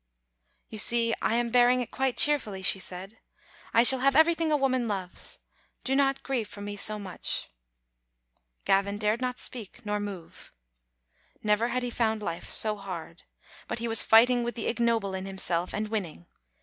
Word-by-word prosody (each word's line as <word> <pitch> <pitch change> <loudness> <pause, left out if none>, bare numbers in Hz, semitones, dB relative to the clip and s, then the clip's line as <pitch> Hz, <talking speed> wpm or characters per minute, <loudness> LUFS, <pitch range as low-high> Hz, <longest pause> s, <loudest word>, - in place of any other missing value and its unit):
" - - -46
You 215 - -3
see, 230 +1 +4
I 225 - 0
am 235 0 -1
bearing 245 +1 +4
it 245 - -5
quite 265 -2 -2
cheerfully," 220 -10 +2
she 195 - +5
said. 190 +4 -6 0.3
" - - -26
I 230 - +4
shall 260 +2 +7
have 275 +1 +2
everything 325 +1 +3
a 300 - +3
woman 260 -3 0
loves; 190 -4 -5 0.5
do 265 - -1
not 275 -1 +1
grieve 250 -6 -2
for 205 - -12
me 205 0 -6
so 210 +1 +1
much." 195 -3 -3 1.1
Gavin 200 +1 +1
dared 215 +3 -1
not 250 0 -3
speak 220 -4 -9
nor 210 0 -2
move. 195 -5 -9 0.9
Never 210 +2 +1
had 250 +1 -2
he 245 - -4
found 220 -2 -1
life 170 -3 -5
so 215 -1 +4
hard; 180 -3 -9 0.5
but - - -4
he 235 +1 -4
was 225 -1 +4
fighting 240 +2 +4
with 240 0 -4
the 235 - -5
ignoble 230 -4 -1
in 190 0 -5
himself, 180 -2 -2
and 210 +1 -4
winning. 180 - -5
220 Hz, 180 wpm, -27 LUFS, 200-245 Hz, 1.1 s, shall